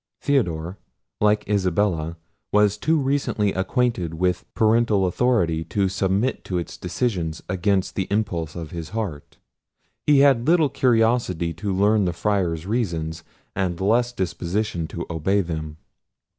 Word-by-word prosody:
Theodore, 90 - 0 0.4
like 105 0 +2
Isabella, 90 -4 0 0.3
was 105 -1 +4
too 160 +9 +1
recently 135 -7 0
acquainted 95 -4 0
with 90 +1 -1
parental 110 -3 +3
authority 90 -5 +1
to 100 -2 0
submit 95 +7 0
to 90 - -2
its 85 - -4
decisions 90 -4 -2
against 95 +1 0
the 95 - -2
impulse 95 -7 -1
of 85 -3 -6
his 85 -3 -6
heart. 85 -10 -5 0.7
He 145 -2 +6
had 135 -3 +4
little 165 -3 +4
curiosity 115 -10 +1
to 100 +6 -4
learn 100 +2 +3
the 90 - 0
Friar's 85 -4 -1
reasons, 85 -8 -2 0.3
and 90 -3 -1
less 120 +5 +2
disposition 90 -3 -2
to 85 +1 -6
obey 90 +5 +1
them. 80 -3 -5
95 Hz, 130 wpm, -23 LUFS, 85-110 Hz, 0.7 s, He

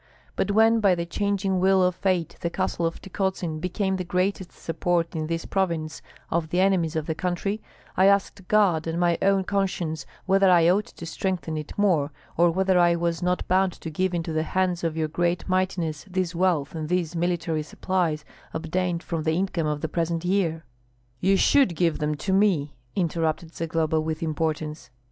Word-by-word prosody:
But - - 0
when 225 +2 +4
by 200 -4 +4
the 170 0 -3
changing 195 +1 0
wheel 190 0 +4
of 180 0 +3
fate 180 -2 -1
the 170 - -1
castle 170 -2 -1
of 165 - -5
Tykotsin 190 -4 -2
became 190 +2 -1
the 185 - -2
greatest 185 +1 -1
support 170 +1 -1
in 155 -1 -2
this 165 0 -3
province 165 -5 -1 0.3
of 165 -1 0
the 175 - 0
enemies 185 -4 +2
of 160 -1 -1
the 160 - -1
country, 185 +5 -2 0.3
I 190 +1 +5
asked 200 -1 +1
God 185 -7 +3
and 165 +1 -2
my 175 -1 +2
own 195 -1 +3
conscience 180 -7 -2 0.2
whether 195 0 +4
I 170 -2 +6
ought 210 +4 +1
to 170 - -10
strengthen 180 -2 -2
it 150 -1 -6
more, 170 -8 +2 0.2
or 170 +1 +4
whether 190 +1 +2
I 175 -1 +5
was 170 0 -1
not 180 0 0
bound 185 0 +2
to 160 - -8
give 185 +3 0
into 165 -1 -2
the 155 - +1
hands 180 +1 0
of 165 -1 -1
your 160 -1 0
great 170 +3 -1
mightiness 185 -5 -1
this 185 -2 -1
wealth 170 -5 +1
and 155 -2 -4
these 175 -2 0
military 170 -2 0
supplies 160 -1 -1 0.3
obtained 170 +2 -1
from 165 -2 -3
the 160 0 0
income 180 -3 -1
of 150 -1 -2
the 160 - -1
present 165 +1 -2
year." 175 -4 0 0.5
"You 195 +5 +3
should 235 -5 +4
give 165 -1 +1
them 150 0 0
to 190 +6 -2
me!" 185 -8 +2 0.2
interrupted 165 -2 -1
Zagloba, 160 -1 0
with 160 +1 -3
importance. 155 -3 -2
175 Hz, 185 wpm, -25 LUFS, 160-190 Hz, 0.5 s, I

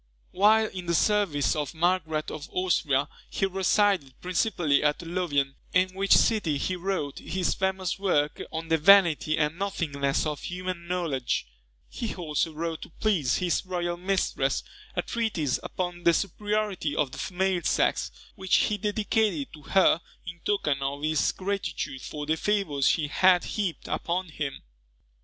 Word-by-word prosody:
While 215 +3 +5
in 185 -4 -6
the 170 - +1
service 185 -7 +2
of 150 +1 -3
Margaret 160 -2 0
of 145 - -7
Austria, 150 -7 +1 0.2
he 195 - 0
resided 190 - +1
principally 180 -5 +1
at 150 +3 +1
Louvain, 165 -6 -1 0.2
in 185 0 +3
which 195 +1 +3
city 190 -10 +2
he 185 - -1
wrote 180 -6 -3
his 185 -1 -1
famous 190 -1 -1
work 150 -7 +1
on 160 +1 -5
the 160 0 +3
Vanity 165 -3 +5
and 155 +2 0
Nothingness 145 -9 -1
of 150 -2 -3
Human 180 -1 -5
Knowledge. 165 -8 -1 0.4
He 230 - -5
also 165 -2 -1
wrote 160 +1 -4
to - - -9
please 175 - +2
his 175 -2 0
royal 175 -2 -2
mistress, 180 -7 0 0.3
a - - 0
treatise 205 - -1
upon 175 -1 -4
the 170 -1 +5
Superiority 205 -5 -1
of 145 -4 0
the - - -8
Female 185 -1 0
Sex, - - +1 0.2
which 190 -2 +1
he 210 -1 +2
dedicated 210 - 0
to 155 - -11
her 175 +2 +3 0.2
in 170 -1 -7
token 155 -8 0
of 140 +2 -3
his 155 0 +2
gratitude 185 -9 -3
for 150 -1 -6
the 160 +2 0
favours 175 -9 +1
she 155 -3 +2
had 180 +4 +4
heaped 195 -8 -3
upon 180 +1 -2
him. 145 -3 -5
175 Hz, 150 wpm, -27 LUFS, 150-190 Hz, 0.4 s, While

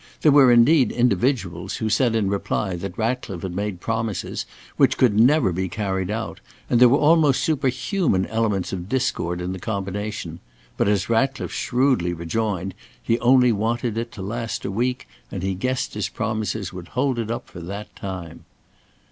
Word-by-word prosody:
There 150 - +6
were 135 -3 +7
indeed 125 +4 +5
individuals 100 -6 0
who 110 - -2
said 115 +2 +2
in 110 -3 +1
reply 100 -1 -1
that 90 +1 -6
Ratcliffe 115 -5 -2
had 90 -2 -4
made 100 -2 -3
promises 115 -1 -3 0.3
which - - +3
never 125 +2 +4
could 85 - -3
be 95 +1 -2
carried 95 -2 -2
out, 110 +1 -4 0.3
and 120 - +4
there 125 - +9
were 135 - +4
almost 150 -3 +4
superhuman 135 - +1
elements 110 -5 -1
of 90 0 -5
discord 90 -9 -1
in 90 +1 -3
the 95 - -6
combination, 100 -3 -4 0.4
but - - +1
as 100 -2 +1
Ratcliffe 135 +4 0
shrewdly 125 -9 +1
rejoined, 95 +2 -2 0.3
he 115 +1 0
only 125 0 +5
wanted 115 +2 -1
it 115 +1 -3
to 95 - -7
last 115 +3 -4
a 95 - -2
week, 125 - -1 0.2
and - - -5
he 95 0 0
guessed 130 +7 -2
his 105 -1 -2
promises 110 -4 -3
would 90 -2 -8
hold 130 -2 +1
it 110 -1 -3
up 120 - -4
for 90 - -11
that 100 +5 -7
time. 90 -4 -7
110 Hz, 175 wpm, -23 LUFS, 95-125 Hz, 0.4 s, there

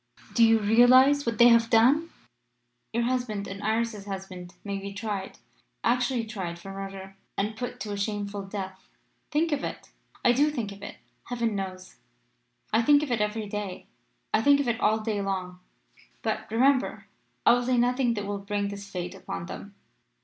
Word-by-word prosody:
Do 235 - +5
you 225 0 +6
realise 245 +6 +5
what 230 -2 0
they 240 +1 +8
have 230 -1 +5
done? 260 +9 +4 0.8
Your 235 +1 0
husband 235 -5 -1
and 195 +1 -7
Iris's 220 -1 -1
husband 190 -2 -7
may 200 -1 -3
be 200 0 -6
tried 205 -2 -4 0.5
actually 245 0 +1
tried 190 -6 -5
for 195 +3 -9
murder 195 0 -8 0.2
and 210 +2 -1
put 245 +3 -5
to 210 0 -4
a 205 - -3
shameful 205 0 -3
death. 190 -1 -7 0.4
Think 315 +2 +1
of 290 -1 0
it!' - - -6 0.3
"'I 245 - +7
do 285 +5 +3
think 235 -9 -3
of 200 0 -11
it, - - -7 0.3
Heaven 235 -3 -1
knows! 185 -1 -6 0.8
I 225 - +5
think 290 +5 +5
of 285 - -4
it 230 -3 +1
every 210 +1 -1
day 200 -2 -5 0.5
I 215 - +4
think 285 +4 +5
of 280 - 0
it 235 -1 0
all 220 +1 +2
day 215 -2 -1
long. 185 -2 -3 0.6
But, 220 0 -2
remember, 260 +4 +2 0.4
I - - +8
will 245 0 +2
say 250 0 +1
nothing 245 0 +2
that 205 -1 -3
will 200 0 -3
bring 200 0 -2
this 200 0 -8
fate 180 -2 -4
upon - - -6
them. 200 +3 -9
215 Hz, 180 wpm, -27 LUFS, 200-240 Hz, 0.8 s, they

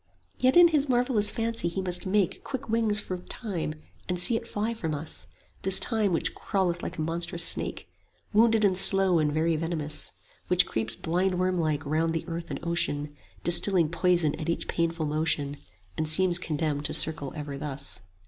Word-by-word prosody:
Yet 255 +5 +3
in 350 -1 +8
his 295 -3 +1
marvellous 245 -4 +2
fancy 230 -5 -2
he 170 +3 -3
must 180 0 0
make 195 -2 +1
15 - - -17
Quick 265 -4 -6
wings 220 -2 +1
for 185 -3 -5
Time, 180 -6 -5 0.3
and 180 -1 -1
see 230 +6 +4
it 230 - -4
fly 220 +1 -2
from 165 -9 -4
us; 155 +2 -3 0.3
This 190 0 +5
Time 220 -4 +1
which 165 - 0
crawleth 180 -4 -2
like - - -6
a - - -3
monstrous 170 +1 -1
snake, - - -2 0.5
Wounded 225 0 +4
and 190 -2 +2
slow 190 -2 +5
and 150 -1 +1
very 160 +2 +1
venomous; 155 -2 0 0.3
Which 180 0 +4
creeps 110 0 -1
blindwormlike 175 -2 -1
round 160 +3 0
the 165 - -3
earth 170 0 -6
and - - -5
ocean, 150 -3 -1 0.3
Distilling 175 -1 +3
poison 170 -2 +1
at 155 - -4
each 170 - -2
painful 165 -1 -1
motion, 150 -1 -1
20 145 - -11 0.4
And 155 -1 -1
seems 175 +1 +5
condemned 150 -3 -2
to - - 0
circle 155 -4 +2
ever 145 -2 -6
thus. 140 -1 -3
170 Hz, 180 wpm, -27 LUFS, 155-195 Hz, 0.5 s, in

